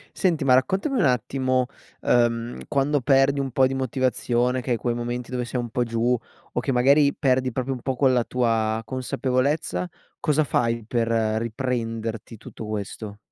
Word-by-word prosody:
Senti 165 -5 +1
ma 130 - +5
raccontami 190 - +2
un - - +3
attimo, 130 0 +1 0.4
ehm, 120 0 +1
quando 140 +1 +1
perdi 135 +2 +3
un 135 -1 -1
po' 130 +1 +3
di 130 - 0
motivazione 130 -1 0
che 125 - -7
hai 120 - +2
quei 120 +1 -1
momenti 120 +1 -4
dove 125 -1 -1
sei 125 +1 -3
un 120 -1 -3
po' 125 - -1
giù, 115 +1 +1 0.4
o - - 0
che - - -1
magari 140 +3 +4
perdi 130 -2 +1
proprio 130 +2 -2
un 125 - -7
po' 130 +1 -2
quella 130 -2 +3
tua 115 -3 0
consapevolezza 130 +6 -1 0.3
cosa 155 -1 +2
fai 115 -4 0
per 115 -1 0
riprenderti 115 0 -2
tutto 110 +1 -9
questo? 105 0 -5
125 Hz, 165 wpm, -24 LUFS, 115-135 Hz, 0.4 s, ma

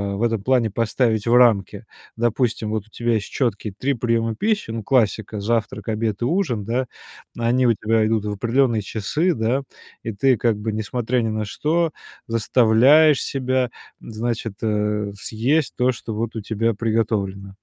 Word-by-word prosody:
в 105 - -5
этом 115 -4 0
плане 125 -3 +2
поставить 115 0 0
в 115 - +3
рамки? 115 -6 +3 0.3
Допустим, 120 -1 0
вот 110 -2 -2
у - - -27
тебя 120 0 -1
есть 100 - -3
чёткие 110 -5 -2
3 140 +4 0
приёма 115 -1 0
пищи, 210 - -1
ну, 115 -1 -4
классика- 110 -3 +1
завтрак, 110 -1 -2
обед 110 -1 -2
и - - +1
ужин, 135 - 0
да? 125 +4 -1 0.5
Они 120 +2 +2
у 115 - +5
тебя 110 +1 +1
идут 110 -2 0
в 105 - -2
определённые 120 +1 +1
часы, 130 - 0
да? 120 +5 0 0.4
И 115 - -3
ты 130 +3 +2
как 115 -1 +1
бы, 110 +1 -3
несмотря 120 +3 -1
ни 115 - -1
на 110 0 -2
что, 160 +8 0 0.4
заставляешь 125 +6 +4
себя, 130 -2 -1 0.3
значит, 115 -1 -4
э, 105 -1 -1
съесть 130 +9 0
то, 125 +1 +3
что 115 -2 -7
вот 115 +1 -3
у 110 - -3
тебя 115 +2 -1
приготовлено. 105 -3 -1
115 Hz, 165 wpm, -22 LUFS, 110-125 Hz, 0.5 s, у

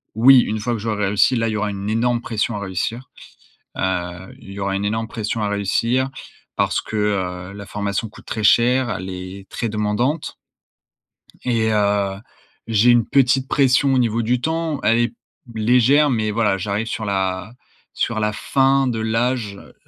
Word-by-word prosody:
oui, 130 +4 +7
une 110 -2 -1
fois 120 +3 -2
que 115 - -3
j'aurais 105 -1 -1
réussi, 105 +5 +3
là, 115 -1 0
il - - -1
y 110 - -2
aura 105 0 -1
une 100 0 -4
énorme 120 +1 +1
pression 115 0 -2
à - - -3
réussir. 100 +7 -4 0.7
Heu, - - -3 0.6
il 100 - -12
y 100 - -7
aura 95 0 -1
une 100 - -2
énorme 110 +2 -1
pression 110 0 -3
à 105 - 0
réussir 115 +6 0 0.5
parce - - +1
que, - - -10 0.6
heu, - - -10
la 100 0 -9
formation 100 +2 -3
coûte 105 - -16
très 110 -1 -4
cher, 125 +4 +4
elle 95 -4 -4
est 95 +1 -8
très 115 - -3
demandante 110 +8 -1 1.1
et 115 -3 +1
heu, 100 -2 +1 0.5
j'ai 115 +1 +4
une 120 -2 +4
petite 135 -1 +3
pression 135 0 +3
au - - +3
niveau 115 -1 +1
du 120 +2 0
temps, 160 +1 -2
elle 115 - +3
est 120 0 0 0.4
légère, 125 +6 +4
mais 110 -4 0
voilà, 105 -3 +1
j'arrive 100 +4 -2
sur 115 -1 -4
la 95 0 -2 0.4
sur 110 -2 -1
la 105 0 0
fin 135 +4 +2
de 115 -2 -2
l'âge, 115 -1 -1
heu, - - -15
110 Hz, 180 wpm, -20 LUFS, 105-125 Hz, 1.1 s, oui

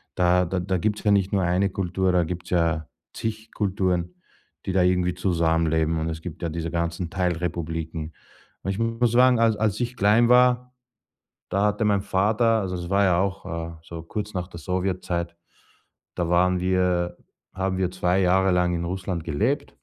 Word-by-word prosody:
Da 90 0 +3
da 90 +2 -2
da 95 +1 -1
gibt's 105 +5 -1
ja 105 - +3
nicht 100 -1 +2
nur 95 -2 +2
eine 90 +3 +2
Kultur, 95 0 -1
da 90 -1 +3
gibt's 90 +1 -6
ja 85 -3 +1 0.3
zig 110 0 -5
Kulturen, 90 -3 -1 0.5
die 95 - -1
da 95 -1 +3
irgendwie 90 0 +2
zusammenleben 80 -3 +1
und 80 +1 -2
es 80 0 -5
gibt 85 0 -8
ja 85 - -1
diese 85 +1 -4
ganzen 85 0 -2
Teilrepubliken. 85 -3 -3 0.5
Und - - -3
ich 95 - -4
muss 115 +1 +1
sagen, 125 0 +5
als 115 -1 +3
als 105 -2 0
ich 120 0 -2
klein 110 +4 +4
war, 125 0 +4 0.8
da 100 +3 +2
hatte 105 +1 0
mein 100 -2 +2
Vater 110 +4 +2
also, 95 -2 -3
es 85 +1 -6
war 100 +1 +3
ja 90 -2 +3
auch, 100 0 -2 0.3
äh, - - -18
so 85 0 -8
kurz 105 +4 -5
nach 90 0 -3
der 85 -3 -10
Sowjetzeit, 90 -1 -2 0.8
da 85 -2 -1
waren 90 +1 +3
wir 90 -1 +1 0.4
haben 95 0 -1
wir 90 -1 0
2 90 +1 +1
Jahre 95 +1 +3
lang 90 0 +2
in 85 0 -2
Russland 90 -2 -3
gelebt. 110 - -1
90 Hz, 180 wpm, -24 LUFS, 85-100 Hz, 0.8 s, sagen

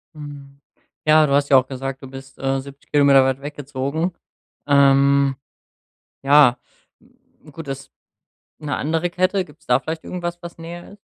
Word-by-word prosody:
Hm. 140 -2 -11 0.5
Ja, 155 0 +6
du 140 - -1
hast 140 0 +2
ja 135 - +7
auch 130 0 +2
gesagt, 135 0 -6
du 135 - -9
bist, 135 0 -12
äh, 135 0 -1
70km 140 0 +3
weit 135 +1 -1
weggezogen. 145 +3 -4 0.5
Ähm, 140 -1 +4 0.9
ja, 140 -3 +6 0.9
gut, 160 +1 -9
das 135 0 -7 0.7
'ne 150 -2 -3
andere 165 +3 -1
Kette? 185 +2 0
Gibt's 155 -1 -20
da 125 +1 +3
vielleicht 160 +2 -6
irgendwas, 175 -1 -5
was 170 -1 -10
näher 170 +3 -9
ist? 205 - -16
140 Hz, 145 wpm, -21 LUFS, 135-160 Hz, 0.9 s, ja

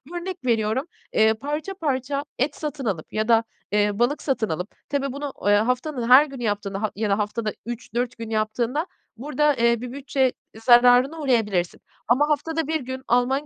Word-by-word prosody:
Örnek 355 -3 -5
veriyorum, 225 +2 +1 0.3
eee, 220 0 +4
parça 295 - -4
parça 280 -5 -2 0.2
et 280 +3 0
satın 295 -3 -5
alıp 185 -8 -3
ya 215 0 0
da, 230 -1 +5 0.3
eee, 205 0 +1
balık 255 +5 +1
satın 260 -6 -1
alıp, 180 +5 -3 0.2
tabii 275 -1 -1
bunu, 280 +1 -5
eee, 205 - +4
haftanın 250 +3 0
her 265 +4 +9
günü 270 -4 -8
yaptığında 205 -2 -2
ha 215 - -1
ya 210 +1 -1
da 200 - +2
haftada 215 +1 -2
3-4 240 +1 -4
gün 230 -1 -6
yaptığında 230 - -1 0.3
burada, 295 +3 +1
eee, 235 -1 +2
bir 250 -1 -6
bütçe 265 -1 0 0.3
zararına 250 +5 +6
uğrayabilirsin 210 - 0 0.3
ama 280 +6 +3
haftada 320 +1 -1
1 320 0 0
gün, 260 +1 -6
alman 250 +4 +2
250 Hz, 175 wpm, -24 LUFS, 220-285 Hz, 0.3 s, her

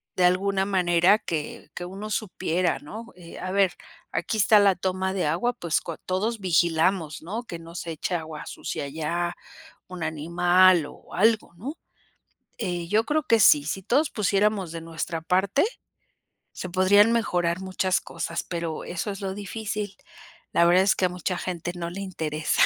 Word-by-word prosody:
de 180 - +3
alguna 190 +2 +2
manera 180 0 +4
que 155 -7 -5
que - - -5
uno 195 +4 -7
supiera, 180 -4 -1
¿no?, 220 +10 -9
eh, 175 -2 -11
a 185 - -4
ver, 195 -1 +3 0.4
aquí 220 - -2
está 215 +1 +6
la 200 -1 +5
toma 185 +1 -1
de 190 -4 0
agua, 175 +11 +1
pues 170 -9 -1
cua 170 - -6
todos 215 +5 -1
vigilamos, 170 -2 +1
¿no? 215 +8 -4
Que 170 -8 -7
no 165 0 -12
se 170 -1 -4
eche 165 +3 -2
agua 160 -2 -5
sucia - - -5
allá 165 +4 -2 0.5
un 180 -2 -6
animal 175 +2 +4
o - - -15
algo, 220 0 +2
¿no?, 260 - -6 0.8
eh, 175 -2 -2
yo 220 +3 +3
creo 305 +1 +1
que 230 -6 +3
sí, 150 -8 +7
si 190 +5 -3
todos 280 - +2
pusiéramos 200 -3 +1
de 165 - -5
nuestra 165 0 -4
parte, 190 - +2 0.9
se 185 - -6
podrían 195 +4 +5
mejorar 175 -6 +1
muchas 185 0 0
cosas, - - -4
pero 170 -2 -4
eso 175 +4 -3
es 195 +1 -7
lo 190 -1 -3
difícil. 205 0 -4 0.6
La 170 - +5
verdad 180 +2 +5
es 195 - +3
que 185 - +1
a - - +2
mucha 180 +1 -3
gente 175 -1 -4
no 170 -1 -4
le 195 +3 -6
interesa. 155 -5 0
185 Hz, 170 wpm, -25 LUFS, 170-200 Hz, 0.9 s, sí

